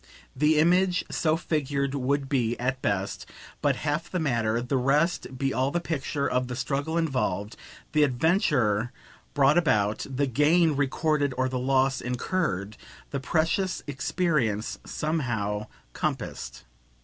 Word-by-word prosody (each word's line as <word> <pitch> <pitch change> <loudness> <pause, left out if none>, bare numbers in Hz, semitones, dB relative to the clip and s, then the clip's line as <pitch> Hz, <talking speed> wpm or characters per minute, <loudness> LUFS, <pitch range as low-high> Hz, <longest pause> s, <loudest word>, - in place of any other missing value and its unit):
The 150 +3 +3
image 180 +3 +3
so 160 -1 +1
figured 140 -4 -1
would 140 +1 0
be, 120 -4 0
at 130 +1 -1
best, 100 -3 -2 0.3
but - - +2
half 155 +3 -2
the 185 - -2
matter; 115 -7 +1
the 125 +3 -2
rest 145 +7 +2
would 130 - -11
be 135 +1 0
all 130 +1 +1
the 175 - 0
picture 145 -3 -2
of 125 0 0
the 125 - -4
struggle 140 +5 -2
involved, 125 - -1 0.4
the 155 - +3
adventure 125 - +2 0.4
brought 145 +3 +5
about, 105 -10 +1
the 135 +2 0
gain 150 +5 +3
recorded 145 0 +1
or 130 0 +2
the 130 -1 -2
loss 135 +1 +2
incurred, 120 - -2 0.3
the 140 - -2
precious 165 +7 0
experience 135 - -1
somehow 110 -10 -2 0.3
compassed. - - -4
135 Hz, 135 wpm, -27 LUFS, 125-155 Hz, 0.4 s, brought